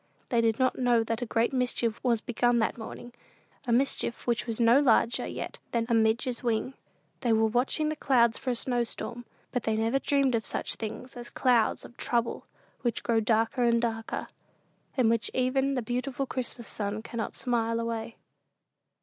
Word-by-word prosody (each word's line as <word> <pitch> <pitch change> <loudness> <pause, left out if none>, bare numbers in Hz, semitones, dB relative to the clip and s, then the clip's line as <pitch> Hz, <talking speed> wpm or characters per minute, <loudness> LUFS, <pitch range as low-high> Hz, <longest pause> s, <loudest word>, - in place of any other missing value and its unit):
They 235 -2 +3
did 225 -1 +2
not 260 0 +1
know 240 -2 +3
that 230 +1 -3
a 245 - -2
great 230 +3 +1
mischief 245 -3 0
was 235 -4 +2
begun 240 0 +1
that 225 - +1
morning 240 +1 -9 0.5
a - - +1
mischief 240 -1 0
which 235 -2 0
was 230 0 -1
no 235 +3 +6
larger 240 -3 +3
yet - - -6
than 230 -1 +1
"a - - +2
midge's 225 +2 +2
wing." 235 +2 -1 0.5
They 240 -3 0
were 220 0 +4
watching 250 +7 +1
the 310 - -2
clouds 235 -6 +3
for 260 - -3
a 245 - +1
snow 245 0 0
storm; 240 +1 -6 0.3
but 250 - -1
they 220 0 0
never 225 +5 +1
dreamed 275 -2 +2
of 225 -1 +1
such - - -2
things 225 +3 -7
as 240 -1 -8
clouds 240 -4 +2
of 240 - -14
trouble, 235 -1 -1 0.3
which 240 -2 -1
grow 230 -2 +2
darker 225 +3 +1
and 235 -1 +4
darker, 225 -1 -2 0.7
and 250 -3 +4
which 225 -1 +2
even 265 +2 +1
the 250 - -1
beautiful 250 +3 -2
Christmas 245 -3 -3
sun 210 +1 -3
cannot 230 -1 -4
"smile 230 -2 0
away." 230 0 -3
235 Hz, 185 wpm, -28 LUFS, 225-250 Hz, 0.7 s, no